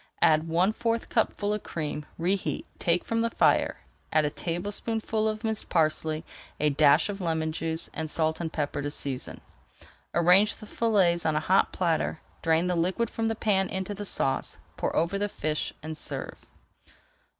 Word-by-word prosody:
Add 160 -1 +4
one 175 +6 +2
fourth 230 0 -1
cupful 210 -2 +1
of 210 - -2
cream, 150 -2 -4
reheat, 185 +3 -1
take 170 +1 +1
from 230 0 0
the 230 - +1
fire, - - +2 0.3
add 155 -1 +3
a 150 - 0
tablespoonful 215 +6 -2
of 215 +1 -4
minced 220 -1 -3
parsley, 155 -1 +1 0.3
a 150 0 +3
dash 145 0 +5
of 200 -1 -5
lemon 160 -2 0
juice, 160 0 -2
and 160 -1 -3
salt 160 +1 0
and 165 -2 -3
pepper 145 -1 -2
to 145 - -2
season. 135 -3 -4 0.7
Arrange 180 +5 +5
the - - -11
fillets 195 -7 +2
on 155 -1 +1
a - - +3
hot 185 +5 +3
platter, 165 -3 0 0.2
drain 165 +1 +2
the 180 0 +1
liquid 185 +7 0
from 225 0 -1
the 225 - 0
pan 195 -3 +1
into 190 +2 -3
the 205 +1 -6
sauce, 135 -8 -1 0.2
pour - - -2
over 170 +5 +1
the 205 0 0
fish, 155 -4 -2
and 155 0 -5
serve. - - -6
170 Hz, 170 wpm, -27 LUFS, 155-205 Hz, 0.7 s, dash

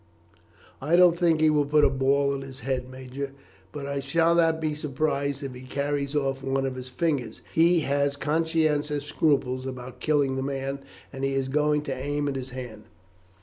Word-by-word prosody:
"I 155 +5 +2
don't 175 -1 +6
think 170 -2 +2
he 155 -1 +5
will 145 -2 +2
put 150 +1 +4
a - - +5
ball 140 +1 +2
in 135 - -4
his 135 -1 -9
head, 130 0 -2
major, 130 +1 -6 0.4
but 145 -1 -6
I 140 0 -2
shall 165 +5 +2
not 165 -1 +3
be 155 -1 -1
surprised 140 -1 -2
if 135 -2 -5
he 125 - -10
carries 140 +2 -2
off 135 -2 0
one 135 0 0
of 135 - -2
his 130 0 -7
fingers. 135 -5 -2
He 170 +1 +4
has 140 0 +1
conscientious 150 -1 0
scruples 135 -4 +1
about 130 -1 -7
killing 145 -3 +1
the - - -1
man, 135 0 -3 0.3
and 135 0 -6
he 135 0 +1
is 135 -1 -1
going 150 +1 +2
to 140 - -3
aim 145 +2 -2
at 140 - -2
his 130 -1 -5
hand." 125 -4 -8
140 Hz, 190 wpm, -26 LUFS, 135-150 Hz, 0.4 s, don't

